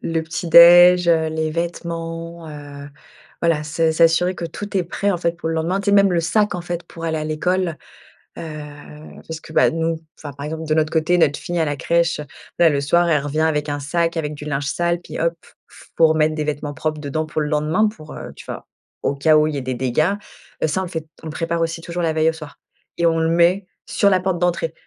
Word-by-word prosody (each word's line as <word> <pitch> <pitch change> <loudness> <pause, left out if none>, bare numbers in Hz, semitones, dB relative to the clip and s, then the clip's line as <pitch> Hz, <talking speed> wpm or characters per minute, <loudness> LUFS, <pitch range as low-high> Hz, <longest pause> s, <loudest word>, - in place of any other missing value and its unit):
Le 165 -1 -1
petit 165 +1 -5
déj, 175 +1 +8
heu, 160 -1 +3
les 160 0 -2
vêtements, 165 0 -5
heu, 145 -1 -9 0.5
voilà, 165 -3 +2
s 160 +1 +1
s'assurer 165 +3 +3
que 170 - -5
tout 205 +4 -5
est 180 - +1
prêt 200 +4 -1
en 175 - -1
fait 170 0 -1
pour 165 -1 -4
le 165 - -1
lendemain. 175 +5 0
Tu 200 - -9
sais, - - +1
même 200 -2 +5
le 170 - +2
sac 205 +4 +1
en 175 - -3
fait 175 0 -5
pour 165 -1 -10
aller 160 -1 -1
à 155 - -3
l'école, 170 +2 -1 0.6
heu - - -6 0.9
parce 160 -1 -6
que, - - -13
bah, - - +5
nous 165 0 -1 0.2
enfin 145 -3 -8
par 140 +1 -7
exemple, 160 +1 -5
de 155 - +1
notre 155 0 +1
côté, 165 +2 +2
notre 145 -3 +2
fille 175 -1 -3
à - - +1
la 145 -1 -2
crèche, 170 0 +1 0.4
là 170 - +6
le 140 -1 0
soir, 170 +4 +2
elle 150 -3 +3
revient 145 +2 -3
avec 150 -2 0
un 145 0 -2
sac 165 +3 -1
avec 150 -1 -2
du 150 - -9
linge 140 -1 -2
sale, 170 +2 0
puis - - -8
hop, 170 0 0
il - - -20
faut 165 - +6
remettre 155 0 +2
des 155 - -2
vêtements 145 0 -3
propres 155 +1 -3
dedans 155 +2 -3
pour 155 0 -4
le 150 - -1
lendemain, 155 +8 +1
pour, 155 -8 -9
heu, - - -8
tu - - -12
vois, - - -8 0.3
au 140 - -1
cas 155 +3 +3
où 150 0 +3
il 155 - -3
y - - -2
ait - - -3
des 130 0 -3
dégâts. 130 +8 +1 0.5
Heu, - - +3
ça, 185 +5 -1
on - - -2
le 175 - -6
fait 160 -3 -5 0.2
on 160 - -6
prépare 165 +1 -2
aussi 165 0 -2
toujours 175 +1 -4
la 160 - +1
veille 160 0 +3
au - - -2
soir 155 -2 -11 0.4
et 170 - +2
on 165 0 +2
le 160 0 +1
met 175 +3 +3 0.2
sur 200 - +2
la 185 - +3
porte 185 -1 -1
d'entrée, 170 -2 0
165 Hz, 250 wpm, -20 LUFS, 155-170 Hz, 0.9 s, déj